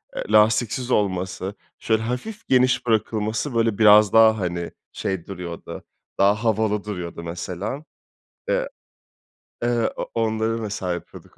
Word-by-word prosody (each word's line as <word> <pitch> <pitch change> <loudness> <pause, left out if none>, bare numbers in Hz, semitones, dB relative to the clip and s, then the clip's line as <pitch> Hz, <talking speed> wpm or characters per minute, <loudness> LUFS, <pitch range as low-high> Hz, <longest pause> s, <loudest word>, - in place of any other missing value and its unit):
eee, - - -3
lastiksiz 110 +4 +3
olması, 95 -1 -1 0.2
şöyle 110 -1 +1
hafif 125 - -5
geniş 125 -1 +3
bırakılması 110 +2 0
böyle 115 -3 +2
biraz 105 -2 +6
daha 110 -1 +6
hani 85 -2 -3 0.2
şey 95 -4 -3
duruyordu, 90 -3 -7 0.4
daha 100 +3 +3
havalı 110 -2 +1
duruyordu 90 -5 -6
mesela. 90 - -5 0.7
E - - +1 1.0
eee, 120 -1 +1
o - - -5
onları 110 0 0
mesela 100 -4 -3
yapıyorduk 85 - -10
110 Hz, 120 wpm, -23 LUFS, 95-115 Hz, 1.0 s, biraz